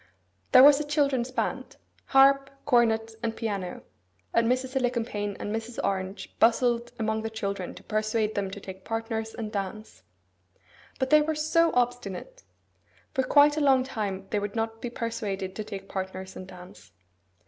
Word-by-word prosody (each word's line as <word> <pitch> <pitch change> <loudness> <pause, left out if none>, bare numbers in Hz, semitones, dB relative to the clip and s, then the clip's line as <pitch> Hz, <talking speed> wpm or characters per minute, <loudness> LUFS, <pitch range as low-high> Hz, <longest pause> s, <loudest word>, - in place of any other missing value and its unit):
There 255 0 +9
was 285 0 +8
a - - -1
children's 280 -4 +1
band,—harp, 275 +1 +1 0.2
cornet, 225 -4 +3
and 225 -1 -2
piano,—and 185 - -4
Mrs. 255 +1 -1
Alicumpaine 230 -5 -1
and 210 - -3
Mrs. 225 +1 -6
Orange 190 0 -3
bustled 235 +1 +3
among 220 0 -1
the 225 - -3
children 200 -4 -4
to 185 - -13
persuade 215 +1 0
them 200 -1 -2
to 195 - -7
take 190 -1 -10
partners 225 0 -3
and 220 -2 -5
dance. 200 - -5 1.0
But 260 0 -1
they 305 0 +7
were 310 +1 -1
so 320 +2 +3
obstinate! 245 - -2 0.7
For 265 - +2
quite 290 +3 +5
a - - +1
long 265 -3 +4
time 205 -7 -4
they 210 - +1
would 205 +1 -4
not 225 0 -2
be 245 - -3
persuaded 205 -5 -4
to 215 - -4
take 195 -2 -8
partners 190 -1 -5
and 185 - -8
dance. 180 - -13
225 Hz, 155 wpm, -27 LUFS, 200-255 Hz, 1.0 s, There